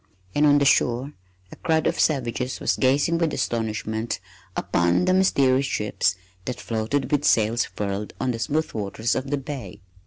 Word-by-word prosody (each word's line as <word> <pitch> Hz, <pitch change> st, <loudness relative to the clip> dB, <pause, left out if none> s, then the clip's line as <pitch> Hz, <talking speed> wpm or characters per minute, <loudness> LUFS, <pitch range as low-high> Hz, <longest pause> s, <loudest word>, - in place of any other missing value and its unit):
And 150 Hz, +1 st, +4 dB
on 145 Hz, 0 st, +6 dB
the 140 Hz, -, +2 dB
shore 130 Hz, +2 st, +2 dB, 0.4 s
a -, -, -9 dB
crowd 160 Hz, -2 st, +1 dB
of -, -, 0 dB
savages 125 Hz, -3 st, 0 dB
was -, -, +1 dB
gazing 140 Hz, +6 st, +2 dB
with 165 Hz, -3 st, 0 dB
astonishment 110 Hz, -2 st, -2 dB, 0.4 s
upon 85 Hz, -, +2 dB
the 185 Hz, -, +3 dB
mysterious 140 Hz, -8 st, +3 dB
ships 105 Hz, -5 st, 0 dB, 0.3 s
that 125 Hz, -, -4 dB
floated 115 Hz, +5 st, -2 dB
with 145 Hz, -1 st, +2 dB
sails 115 Hz, -2 st, +3 dB
furled 100 Hz, 0 st, -4 dB
on 130 Hz, -1 st, 0 dB
the 115 Hz, -, -4 dB
smooth 155 Hz, +6 st, -1 dB
waters 110 Hz, +2 st, -1 dB
of 130 Hz, +1 st, -3 dB
the 145 Hz, -, 0 dB
bay. 135 Hz, -6 st, -7 dB
130 Hz, 165 wpm, -24 LUFS, 110-145 Hz, 0.4 s, on